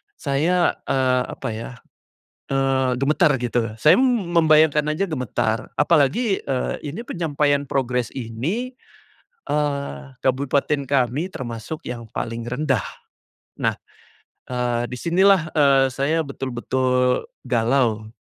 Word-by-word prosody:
saya, 165 +6 +1 0.2
eee, 130 -1 +2
apa - - -5
ya, 115 +4 -6 0.8
eee, 135 -1 +1
gemetar 150 +3 +3
gitu. 120 -2 -1
Saya, 155 +8 +6
m 240 -9 +1
membayangkan 155 -2 +5
aja 160 +6 0
gemetar 120 - -2
apalagi, 170 - +2
eee, 130 -2 -1
ini 150 +10 -5
penyampaian 145 -4 0
progress 125 -3 -1
ini, 145 - -3 0.7
eee, 140 - -1 0.2
kabupaten 140 +2 +1
kami 140 +6 0
termasuk 120 +5 -6
yang 120 -1 -5
paling 115 0 -4
rendah. 130 +6 0 0.8
Nah, - - +1 0.7
eee, 120 -1 -1
di 125 - -6
sinilah, 175 0 +3
eee, 140 -3 +5
saya 155 +5 0
betul-betul 130 -1 0 0.2
galau, 120 -2 +1
135 Hz, 110 wpm, -22 LUFS, 125-155 Hz, 0.8 s, Saya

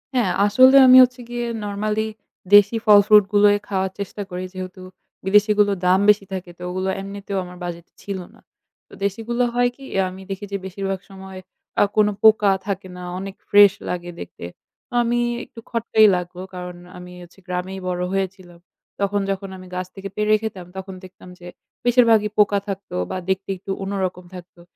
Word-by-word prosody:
হ্যাঁ 220 -8 +2
আসলে 255 +6 +6
আমি 255 - +9
হচ্ছে 250 0 -1
গিয়ে 240 0 -3 0.2
নরমালি 210 +2 -2 0.5
দেশি 205 +2 +6
ফল-ফ্রুটগুলোই 205 0 +6
খাওয়ার 190 -2 -1
চেষ্টা 200 +1 -5
করি। 180 +1 -5
যেহেতু 185 0 -8 0.4
বিদেশিগুলো 210 +1 +4
দাম 185 +1 +4
বেশি 205 -1 +4
থাকে 180 -2 -6
তো - - -17
ওগুলো 185 +1 -2
এমনিতেও 200 0 -6
আমার 180 0 -12
বাজেট 170 -1 -6
ছিল 200 -2 -5
না। - - -20 0.5
ও - - -16
দেশিগুলো 230 +5 -1
হয় 245 0 +2
কি? 275 - -15
অ্যা 195 -1 +2
আমি 190 +1 -11
দেখি 195 +1 -5
যে 200 - -1
বেশিরভাগ 195 0 -4
সময় 190 -1 -10 0.4
আ - - +7
কোনো 210 -1 +4
পোকা 215 -2 +6 0.2
থাকে 195 -1 -3
না, 180 - -8 0.2
অনেক 195 +1 -7
ফ্রেশ 205 -1 +7 0.2
লাগে 175 0 -4
দেখতে। - - -9 0.6
আমি 240 +1 0 0.2
একটু 230 - -13
খটকাই 225 -2 +3
লাগলো 180 0 -5
কারণ 180 -1 -7 0.2
আমি 180 0 -11
হচ্ছি 175 +3 -18
গ্রামেই 180 +1 -4
বড় 180 0 -2
হয়েছিলাম। 185 -2 -4 0.4
তখন 200 0 0
যখন 195 0 -4
আমি 185 0 -12
গাছ 185 0 -3
থেকে 195 0 -7
পেড়ে 210 0 +2
খেতাম 200 -5 -6
তখন 190 0 -7
দেখতাম 185 0 -14
যে 175 - -11 0.4
বেশিরভাগই 230 -3 +4
পোকা 205 -1 +4
থাকতো 195 - -6 0.2
বা - - -3
দেখতে 190 +1 -1
একটু 195 +1 -7
অন্য 195 +1 -4
রকম 180 0 -6
থাকতো। 175 -1 -13
195 Hz, 170 wpm, -21 LUFS, 185-210 Hz, 0.6 s, আমি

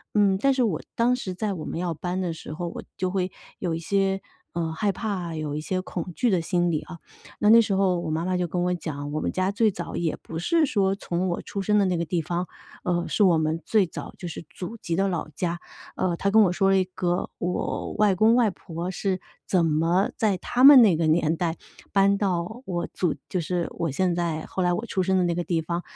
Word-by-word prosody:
嗯， 200 -2 +4
但 275 +3 +3
是 260 - 0
我 195 -10 0 0.2
当 240 +2 +3
时 195 -7 -5
在 200 +2 -2
我 160 -4 -6
们 - - -4
要 175 -1 -1
搬 180 +4 -3
的 175 -2 -2
时 155 -1 -8
候， 175 +2 -4
我 - - -7
就 185 - 0
会 185 -1 -1 0.3
有 175 -3 -2
一 165 - -2
些， 195 +2 0 0.3
呃， 165 -1 -2
害 200 +5 0
怕， 190 -4 -3
有 150 -2 -3
一 - - -2
些 185 +4 -2
恐 180 -1 -5
惧 245 - +2
的 185 -4 +3
心 175 +1 +1
理 155 -3 0
啊。 170 -2 -10 0.4
那 210 - +4
那 230 - +9
时 215 -3 -1
候 190 -2 +2
我 165 -2 -3
妈 160 +1 -1
妈 185 +1 0
就 180 - 0
跟 175 +2 -2
我 180 0 +1
讲， 145 -4 -5
我 155 - -1
们 - - -1
家 185 +1 0
最 215 +1 +2
早 170 -2 -6
也 165 -2 -1
不 165 - -7
是 310 - +2
说 195 -5 +2
从 185 -1 -2
我 175 - -2
出 200 - -5
生 210 +2 +3
的 200 - +3
那 180 -2 +1
个 170 - -1
地 170 +1 -1
方， 175 +3 -2 0.4
呃， 175 -1 0
是 210 - +2
我 175 -4 +5
们 155 +1 0
最 210 -4 +3
早 - - -8
就 180 - -5
是 165 0 -7
祖 195 +6 -7
籍 170 -6 -3
的 195 +3 +2
老 175 -5 -2
家， 170 +3 -3 0.4
呃， 180 -2 0
她 200 - 0
跟 220 +2 +6
我 180 - +3
说 195 +2 +2
了 195 - +4
一 190 - +3
个 175 -1 -1
我 180 +1 -2
外 210 -2 +3
公 220 +5 +4
外 235 -5 +3
婆 175 0 -6
是 190 0 -1 0.3
怎 175 -3 +3
么 165 +5 +2
在 205 -4 +1
他 245 +7 0
们 275 -2 +11
那 195 -7 +5
个 165 0 +1
年 160 0 +2
代 165 -1 -1 0.4
搬 200 0 +3
到 190 +4 -1
我 175 -2 -2
祖 180 - 0
就 185 - -1
是 175 +1 -1
我 170 - -2
现 175 +6 +1
在 170 -2 -2
后 190 - -4
来 180 -1 +2
我 220 - -2
出 190 -5 -1
生 190 +1 +2
的 185 - +3
那 175 - +1
个 175 +1 -2
地 170 -1 0
方。 170 +2 -2
180 Hz, 270 characters per minute, -25 LUFS, 170-195 Hz, 0.4 s, 们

